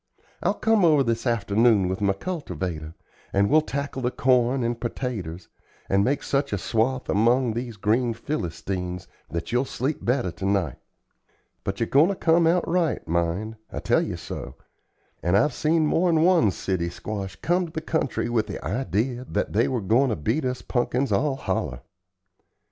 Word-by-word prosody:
I'll - - +1
come 225 -3 +2
over 155 -5 +5
this 115 +1 -1
afternoon 110 -2 +3
with 95 +2 -3
my 100 -1 +3
cultivator, 90 - -5 0.4
and 100 +3 +2
we'll 155 +1 +6
tackle 140 -2 -4
the 125 - +1
corn 125 0 +2
and 115 0 -1
pertaters, 105 -9 -4 0.4
and 100 +1 +3
make 140 +6 0
such 140 +1 0
a 100 - 0
swath 115 +6 0
among 120 +3 +3
these 120 -1 -5
green 115 +3 +1
Philistines 90 - -4 0.2
that 85 +3 -4
you'll 125 +2 +2
sleep 135 +2 -3
better 120 -6 +1
to 95 - -6
night. 95 -9 0 0.9
But 95 0 -3
ye're 115 - +2
goin' 140 +7 +5
to 200 - -1
come 165 -1 +3
out 175 +2 +2
right, 170 - 0
mind, 85 +7 -1
I - - -6
tell - - +2
ye - - -3
so; 65 - -7 0.7
and 90 +3 +3
I've 130 +7 +3
seen 155 +3 +2
mor'n 165 0 +3
one 175 - +5
city 90 -2 -2
squash 95 +2 -5
come 175 +1 0
to - - -12
the 160 - -3
country 155 -7 -1
with 115 -3 0
the - - -6
idee 125 0 -1
that 105 - -1
they 115 +4 +3
were 125 -3 -1
goin' 115 +8 +3
to 110 - 0
beat 115 - -1
us 125 0 -2
punkins 125 0 0
all 135 +7 +2
holler." 60 - -3
120 Hz, 175 wpm, -25 LUFS, 100-140 Hz, 0.9 s, we'll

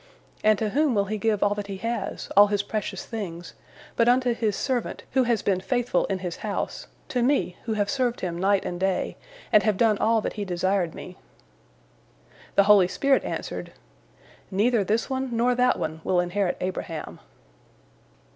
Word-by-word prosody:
And 215 -1 +5
to 215 0 -1
whom 285 +2 +2
will 200 -1 +2
he 215 +2 -3
give 215 0 +1
all 205 - +3
that 205 -1 -5
he 195 -1 -5
has, 230 +4 -3
all 205 +1 +8
his 205 -1 0
precious 205 -3 -4
things, 175 -7 -6 0.4
but 230 0 +4
unto 250 0 +3
his 220 -3 -1
servant, 255 0 -2
who 260 -2 +3
has 235 -2 +1
been 190 -2 +1
faithful 245 +2 0
in 195 - -2
his 175 - -4
house, 205 -2 -4 0.2
to 250 - 0
me, 245 -8 +1
who 225 - -1
have 205 -1 0
served 245 +1 -1
him 175 -2 -2
night 195 +1 +2
and 175 - -4
day, 190 -1 -1 0.4
and 210 - +6
have 215 -3 +1
done 220 -2 +3
all 225 +1 +3
that - - -3
he 210 - -4
desired 185 -1 0
me?" 180 - -9 1.4
The 200 - +6
holy 200 -3 +6
spirit 275 +8 +2
answered, - - -5 0.8
"Neither 215 +3 +2
this 215 +4 0
one 260 -3 -2
nor 245 +2 +3
that 250 0 +2
one 160 +1 -4
will 180 - +2
inherit 175 +2 0
Abraham." 165 - -5
210 Hz, 180 wpm, -25 LUFS, 190-235 Hz, 1.4 s, all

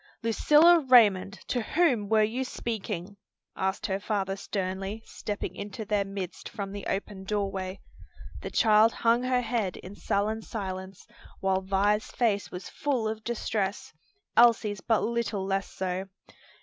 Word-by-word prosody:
"Lucilla 300 +9 +6
Raymond, 215 - +4
to 245 - 0
whom 245 - +1
were 220 -1 +4
you 235 +5 -1
speaking?" 205 -6 -5 0.4
asked 190 0 -1
her 190 0 -1
father 200 -2 -1
sternly, 195 +1 -4
stepping 205 -1 -5
into 205 +2 -6
their 205 -1 +1
midst 195 -2 -6
from 200 -1 -5
the 200 -1 -6
open 195 0 -3
door 200 0 -1
way. 190 0 -5 0.6
The - - -5
child 220 0 +5
hung 235 +1 +2
her 255 0 +1
head 225 -6 -1
in 185 - -10
sullen 210 +2 -1
silence, 190 -3 -6 0.3
while 190 0 +1
Vi's 200 +2 +1
face 215 -5 0
was 180 - -7
full 260 -6 -1
of 220 0 -4
distress; 215 -3 -2 0.4
Elsie's 220 -4 +4
but 225 -2 +1
little 230 -4 -1
less 195 0 -1
so. 185 0 -3
205 Hz, 145 wpm, -28 LUFS, 195-230 Hz, 0.6 s, Lucilla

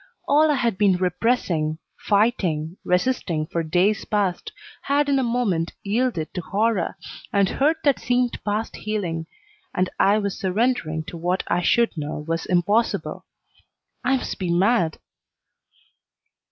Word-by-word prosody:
All 305 +2 +5
I 295 - +3
had 235 -7 0
been 195 -3 +4
repressing, 180 -4 0 0.2
fighting, 185 -7 +1
resisting 180 -5 0
for 170 +2 -2
days 180 +6 +1
past, 200 -4 -1 0.3
had 285 +1 +1
in 275 -1 +3
a - - +1
moment 230 -9 0
yielded 210 -6 -1
to 180 - -3
horror, 205 0 0 0.3
and 200 -1 +3
hurt 300 - +1
that 285 -3 +3
seemed 245 0 0
past 210 +2 -2
healing, 175 -7 -3 0.5
and 185 0 0
I 200 +2 +5
was 200 -2 -2
surrendering 190 -5 0
to 170 - -8
what 180 +3 -1
I 175 - +1
should 235 +5 +2
know 150 -1 -5
was 165 0 -2
impossible. 205 +6 0 0.8
I 265 +1 +3
must 250 - -5
be 180 -3 -1
mad! 180 -2 +2
200 Hz, 140 wpm, -23 LUFS, 170-235 Hz, 0.8 s, All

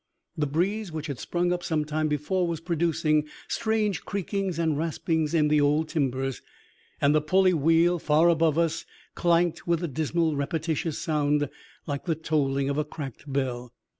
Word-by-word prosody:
The 150 -1 0
breeze 185 +7 -1
which 155 -1 -5
had 140 -6 -5
sprung 175 +7 0
up 175 - -3
some 155 -2 0
time 155 +1 -1
before 155 +5 0
was 165 -2 -2
producing 160 -2 +1 0.2
strange 215 -5 0
creakings 195 -2 -2
and 160 -2 +1
raspings 160 0 -1
in 155 -2 +4
the 150 0 +3
old 150 +2 +2
timbers, 135 -3 -1 0.6
and 140 +1 +4
the 155 - +3
pulley 185 +4 +3
wheel 165 +3 +3
far 155 +2 +3
above 165 -2 +3
us 165 -2 +1 0.3
clanked 170 -1 +1
with 170 0 +1
a - - 0
dismal 160 +2 0
repetitious 160 +2 -2
sound, 145 -2 0 0.3
like 145 -2 -4
the 165 -3 0
tolling 140 -3 0
of 140 +1 0
a - - +2
cracked 145 -2 -8
bell. 125 -3 -2
155 Hz, 165 wpm, -26 LUFS, 145-170 Hz, 0.6 s, in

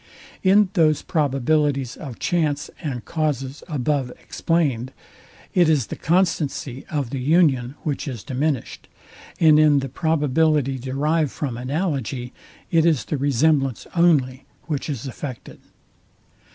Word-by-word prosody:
In 200 +1 +4
those 155 -5 +3
probabilities 140 -3 0
of 135 -8 -8
chance 150 -4 -1
and 135 -7 -4
causes 145 -4 -2
above 145 -4 -1
explained, 135 -7 -1 0.6
it 175 -3 +4
is 145 -7 +2
the - - -6
constancy 150 -7 -1
of 140 -5 -2
the 135 - -3
union, 135 -3 +2
which 150 -1 -3
is 120 -7 -5
diminished; 135 +1 -2 0.5
and 155 -2 +6
in 150 -2 +5
the 135 -1 -1
probability 150 -2 +1
derived 145 +4 0
from 135 -4 -4
analogy, 130 - -3 0.4
it 165 -1 +4
is 160 -5 +2
the 150 - -2
resemblance 140 -1 +1
only, 140 -7 +2 0.2
which 150 -2 -3
is 135 -3 -4
affected. 130 -1 -7
145 Hz, 125 wpm, -22 LUFS, 130-160 Hz, 0.6 s, and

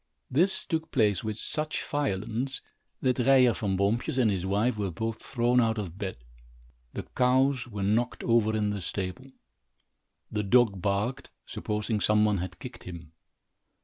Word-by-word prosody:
This 175 +9 +3
took 160 -1 -2
place 105 - +2
with 110 -1 -3
such 155 +5 -2
violence, 125 -2 -2 0.4
that 130 -1 +2
Ryer 125 -1 +5
Van 100 -4 -1
Boompjes 105 +6 0
and 120 -5 +4
his 95 -1 -2
wife 105 +5 +1
were 100 -2 -2
both 115 +6 -4
thrown 120 +1 +2
out 115 -1 +1
of 95 -3 -5
bed. 95 -7 -4 0.8
The - - -3
cows 130 0 +3
were 105 -4 -5
knocked 115 +5 0
over 115 -2 +3
in 105 -1 0
the 100 -1 -3
stable. 95 +9 -5 1.0
The 105 - 0
dog 105 -2 +3
barked, 105 +8 -1 0.2
supposing 105 +1 -2
some 105 0 +4
one 105 -3 +2
had 90 +2 -5
kicked - - -10
him. 85 -3 -9
110 Hz, 155 wpm, -28 LUFS, 100-125 Hz, 1.0 s, Ryer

